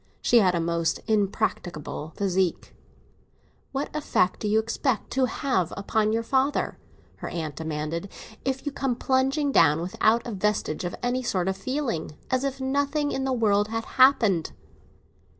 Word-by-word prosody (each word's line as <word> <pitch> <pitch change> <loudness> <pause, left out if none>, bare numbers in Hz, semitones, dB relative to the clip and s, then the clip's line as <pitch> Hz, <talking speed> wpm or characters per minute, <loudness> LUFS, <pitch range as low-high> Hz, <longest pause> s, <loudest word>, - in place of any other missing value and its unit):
She 240 - +4
had 185 -4 +3
a - - +1
most 170 0 0
impracticable 190 -7 -1
physique. 190 -2 0 1.0
"What 280 +2 -4
effect 240 -11 +1
do 210 - -2
you 210 +1 +3
expect 230 +2 -1
to 265 0 +2
have 245 - -1
upon 215 +2 +1
your 225 +1 0
father," 270 +4 0 0.4
her - - -6
aunt 155 -4 -4
demanded, 160 +3 -4 0.3
"if 265 +1 -2
you 290 - -1
come 270 -3 -1
plumping 270 +3 +1
down, 150 - +5
without 215 +6 +1
a 240 - -4
vestige 200 -4 -1
of 175 - -3
any 245 +1 0
sort 190 -7 -1
of 190 - 0
feeling, 230 - -3
as 255 0 +1
if 275 -1 -2
nothing 285 +2 0
in 265 - -2
the 265 - 0
world 210 -4 +2
had 225 +1 -3
happened?" 230 - +4
220 Hz, 155 wpm, -26 LUFS, 180-265 Hz, 1.0 s, down